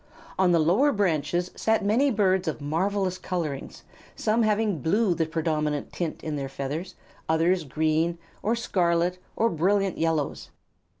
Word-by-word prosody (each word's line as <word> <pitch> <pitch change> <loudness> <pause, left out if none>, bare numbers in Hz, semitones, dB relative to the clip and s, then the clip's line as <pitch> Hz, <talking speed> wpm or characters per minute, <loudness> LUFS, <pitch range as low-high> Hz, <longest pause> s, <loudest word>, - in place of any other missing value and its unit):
On 185 -2 +4
the 170 - +5
lower 185 - +3
branches 175 - 0
sat 220 -2 +1
many 240 +8 +3
birds 190 -5 +2
of 155 - -2
marvellous 185 +5 -1
colorings, 160 -7 -4 0.3
some 220 +2 +1
having 215 -6 +1
blue 195 - +2
the 165 -2 -1
predominant 155 -2 -1
tint 170 -3 -4
in 155 -2 -3
their 135 -1 -4
feathers, 150 +7 -5 0.3
and - - +4
others 175 +1 +2
green, 160 +3 0 0.2
or 225 +3 +1
scarlet, 180 -5 +1 0.2
or 230 - +2
brilliant 195 +2 +1
yellows. 160 -3 -1
175 Hz, 145 wpm, -26 LUFS, 160-200 Hz, 0.3 s, the